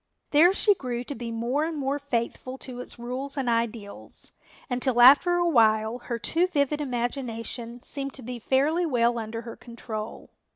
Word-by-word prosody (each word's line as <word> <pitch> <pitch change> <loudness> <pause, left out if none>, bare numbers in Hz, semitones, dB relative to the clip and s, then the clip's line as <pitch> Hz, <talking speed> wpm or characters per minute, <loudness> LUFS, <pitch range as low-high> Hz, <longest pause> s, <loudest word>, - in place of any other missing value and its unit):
There 320 +5 +6
she 410 +1 +4
grew 245 -8 -4
to 285 - -6
be 235 -2 -6
more 240 +6 -1
and 325 -1 -4
more 280 0 -1
faithful 255 -1 -3
to 255 -2 -9
its 250 - -9
rules 255 +4 -5
and 265 -2 -1
ideals, 230 -3 -3 0.4
until 250 -1 0
after 285 +8 +7
a 350 0 +2
while 220 -4 +3
her 240 -1 -4
too 335 +9 +1
vivid 295 -3 0
imagination 240 -2 -4
seemed 275 -1 -3
to 265 - -7
be 245 +1 -6
fairly 285 +9 +1
well 240 -4 +2
under 225 +1 -5
her 230 0 -8
control. 225 -2 -8
250 Hz, 170 wpm, -26 LUFS, 235-280 Hz, 0.4 s, after